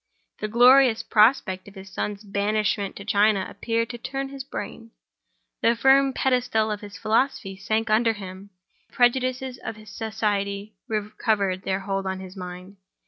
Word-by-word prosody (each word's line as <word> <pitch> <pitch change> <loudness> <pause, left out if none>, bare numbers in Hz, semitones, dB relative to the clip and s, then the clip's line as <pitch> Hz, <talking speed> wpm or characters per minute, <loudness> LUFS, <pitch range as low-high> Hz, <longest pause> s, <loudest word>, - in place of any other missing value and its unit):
The 215 - -2
glorious 245 +1 +6
prospect 210 -4 +3
of 200 - -13
his 190 0 -11
son's 205 +2 -4
banishment 205 0 -1
to 200 - -9
China 205 -2 +3
appeared 230 +3 -2
to 240 - -8
turn 270 +2 -4
his 275 -1 -7
brain. 230 -3 -7 0.7
The 230 - +4
firm 270 +3 +5
pedestal 250 -4 +1
of 210 - -4
his 205 -3 -9
philosophy 215 -1 0
sank 220 +3 -1
under 225 +1 +4
him; 195 -1 -9 0.4
the - - -32
prejudices 255 +1 +1
of 225 - -6
society 210 -2 -2
recovered 210 -3 -1
their 190 0 -1
hold 195 0 -2
on 190 0 -3
his 190 0 -10
mind. 180 +1 -9
215 Hz, 150 wpm, -25 LUFS, 195-235 Hz, 0.7 s, glorious